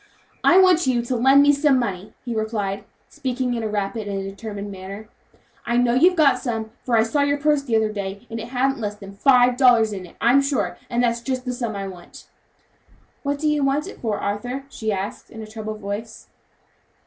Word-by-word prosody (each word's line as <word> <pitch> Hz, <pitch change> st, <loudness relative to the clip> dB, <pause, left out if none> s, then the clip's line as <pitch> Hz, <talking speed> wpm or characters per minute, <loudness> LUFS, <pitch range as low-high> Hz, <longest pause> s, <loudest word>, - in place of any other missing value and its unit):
"I 360 Hz, -, +6 dB
want 365 Hz, -5 st, +5 dB
you 240 Hz, -2 st, +2 dB
to 250 Hz, +2 st, -2 dB
lend 270 Hz, +4 st, +6 dB
me 290 Hz, 0 st, +5 dB
some 280 Hz, -1 st, +3 dB
money," 200 Hz, -5 st, -3 dB
he 240 Hz, -, -3 dB
replied, 210 Hz, -3 st, -2 dB, 0.2 s
speaking 255 Hz, -3 st, -2 dB
in 235 Hz, -, -2 dB
a 220 Hz, -, -2 dB
rapid 210 Hz, +1 st, -3 dB
and 195 Hz, -1 st, -3 dB
determined 200 Hz, +1 st, -6 dB
manner; 195 Hz, +3 st, -9 dB, 0.5 s
"I 235 Hz, -, 0 dB
know 245 Hz, -1 st, +3 dB
you've 350 Hz, +9 st, +5 dB
got 305 Hz, -5 st, +4 dB
some, 225 Hz, -3 st, -3 dB
for 240 Hz, -2 st, +1 dB
I 220 Hz, -, +5 dB
saw 285 Hz, +6 st, 0 dB
your 285 Hz, 0 st, +2 dB
purse 295 Hz, 0 st, +2 dB
the 245 Hz, -5 st, -1 dB
other 220 Hz, -1 st, +2 dB
day, 200 Hz, -1 st, -5 dB
and 225 Hz, +1 st, -6 dB
it -, -, -6 dB
hadn't 265 Hz, +2 st, 0 dB
less 210 Hz, -2 st, -3 dB
than 200 Hz, -1 st, -11 dB
five 250 Hz, +3 st, +4 dB
dollars 235 Hz, -5 st, +5 dB
in 185 Hz, -2 st, -6 dB
it, -, -, -18 dB
I'm 250 Hz, +4 st, +5 dB
sure, 275 Hz, -1 st, -1 dB
and 240 Hz, +1 st, +1 dB
that's 235 Hz, -1 st, +1 dB
just 255 Hz, +1 st, -3 dB
the 250 Hz, -, -2 dB
sum 235 Hz, -4 st, -3 dB
I 195 Hz, 0 st, -4 dB
want." 180 Hz, -2 st, -12 dB, 1.0 s
"What 285 Hz, 0 st, -1 dB
do 305 Hz, +2 st, -1 dB
you 300 Hz, -1 st, +1 dB
want 275 Hz, +3 st, +1 dB
it 395 Hz, -, -10 dB
for, 220 Hz, -3 st, -1 dB
Arthur?" 245 Hz, +7 st, -3 dB
she 220 Hz, -5 st, -3 dB
asked 195 Hz, 0 st, -4 dB
in 225 Hz, -1 st, -9 dB
a -, -, -7 dB
troubled 215 Hz, 0 st, -7 dB
voice. 205 Hz, +2 st, -6 dB
235 Hz, 215 wpm, -22 LUFS, 210-270 Hz, 1.0 s, I